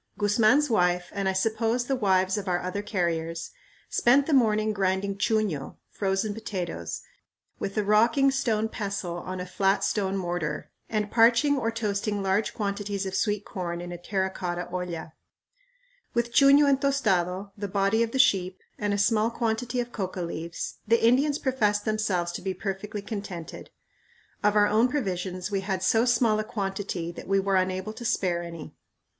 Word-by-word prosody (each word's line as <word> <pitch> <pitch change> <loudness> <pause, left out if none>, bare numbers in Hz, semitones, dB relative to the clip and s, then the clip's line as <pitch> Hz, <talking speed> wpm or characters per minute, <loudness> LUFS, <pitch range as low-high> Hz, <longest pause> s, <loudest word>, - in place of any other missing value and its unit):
Guzman's 215 +8 +4
wife, 180 -6 +1
and 195 -1 -1
I - - 0
suppose 225 +4 0
the 270 - 0
wives 190 -5 +2
of 205 -2 -4
our 175 -1 +1
other 185 +3 -3
carriers, 170 -5 -2 0.4
spent 270 +4 +4
the 315 - -1
morning 215 -4 +3
grinding 195 0 0
chuño 200 -11 0 0.2
(frozen 195 +1 -1
potatoes) 180 - -5 0.6
with 195 - -4
a 210 - +2
rocking 230 +7 +4
stone 225 -5 0
pestle 200 -6 -4
on 185 +1 -5
a 180 - -4
flat 195 +2 +1
stone 195 -2 0
mortar, 175 -4 -3 0.2
and 210 -1 -1
parching 235 +5 +5
or 235 -4 0
toasting 210 -2 -2
large 195 +3 0
quantities 200 -1 -2
of 190 - -4
sweet 205 0 0
corn 170 -2 -4
in 175 0 -6
a 175 - -5
terra 190 +1 -1
cotta 175 -2 -4
olla. 175 -3 -5 1.0
With 235 0 0
chuño 280 +1 +6
and 275 -1 +3
tostado, 195 -8 +1
the 205 -1 -4
body 200 +3 +1
of 230 - +1
the 265 - -3
sheep, 185 -7 +3 0.2
and 205 -1 0
a - - -1
small 215 +2 +2
quantity 235 +1 -2
of 240 0 -3
coca 185 -4 -4
leaves, 170 0 -5
the 230 +1 +3
Indians 280 +5 +3
professed 210 -8 0
themselves 200 -5 0
to - - -6
be 190 0 -3
perfectly 200 +1 -4
contented. 200 -6 -7 0.7
Of 210 0 +3
our 205 0 +6
own 220 +4 +3
provisions 190 -7 -3
we 195 -1 0
had 190 -1 -2
so 225 +4 +3
small 235 -3 +3
a - - 0
quantity 195 -5 -3
that - - -10
we 195 0 +3
were 195 0 +1
unable 185 +3 0
to 240 - -9
spare 180 -6 0
any. 170 -2 -8
200 Hz, 170 wpm, -27 LUFS, 185-225 Hz, 1.0 s, chuño